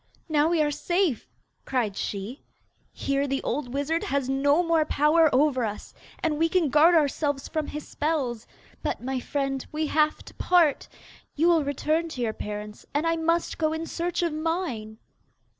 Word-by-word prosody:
'Now 305 -2 +3
we 335 -2 +3
are 295 - 0
safe,' 345 - 0 0.3
cried 235 -7 -1
she. 205 +8 -4 0.5
'Here 275 +1 -1
the 270 0 -2
old 250 -1 -2
wizard 285 +5 -1
has 275 -1 -1
no 285 +5 +3
more 330 -2 +3
power 305 +2 +4
over 260 -1 +3
us, 210 -2 -5 0.3
and 305 -2 0
we 330 0 +3
can 340 -4 +2
guard 315 +5 +5
ourselves 285 -2 +1
from 310 -2 -2
his 300 0 -6
spells. 275 -7 -2 0.3
But, - - -3
my 260 0 -2
friend, 275 0 -2
we 310 +1 -1
have 305 0 +1
to - - -12
part! 345 -5 +2 0.5
You 330 +4 +3
will 330 -3 +4
return 305 +4 0
to 260 -6 -6
your 225 -2 0
parents, 210 0 -7
and 295 +3 +1
I 330 0 +2
must 330 +1 0
go 310 -1 +1
in 320 +1 -3
search 345 +1 -2
of 335 -3 0
mine. 310 -10 -3
300 Hz, 175 wpm, -26 LUFS, 270-325 Hz, 0.5 s, guard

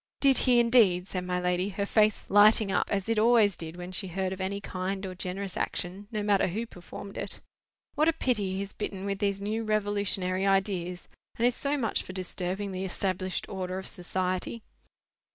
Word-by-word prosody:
"Did 275 -2 +5
he, 245 -1 +6
indeed!" 220 -7 +4
said 185 -2 -4
my 180 0 -1
lady, 180 +2 0
her 200 +1 -2
face 215 0 +2
lighting 205 0 +6
up, 185 - +1
as 195 -1 -1
it 225 -1 +2
always 220 -3 +5
did 160 0 -7
when 180 +1 -7
she 190 +1 -2
heard 190 +1 -2
of 190 - -6
any 195 +1 -2
kind 190 0 -3
or 185 - -5
generous 185 +1 -4
action, 190 +3 -3
no 215 -2 -2
matter 205 -2 +3
who 215 +6 -2
performed 200 0 -9
it. - - -4 0.5
"What 305 +2 +3
a - - +2
pity 215 -11 0
he 190 - -2
is 200 - -9
bitten 195 -1 -4
with 200 -1 -2
these 200 -2 0
new 215 +3 -2
revolutionary 200 -3 0
ideas, 190 -2 0 0.3
and 235 - +2
is 245 - +4
so 285 +1 -1
much 225 -6 0
for 185 - -9
disturbing 185 +1 -3
the 185 0 -3
established 185 0 -2
order 185 -1 -4
of 190 - -5
society!" 185 +4 -2
195 Hz, 195 wpm, -28 LUFS, 185-210 Hz, 0.5 s, he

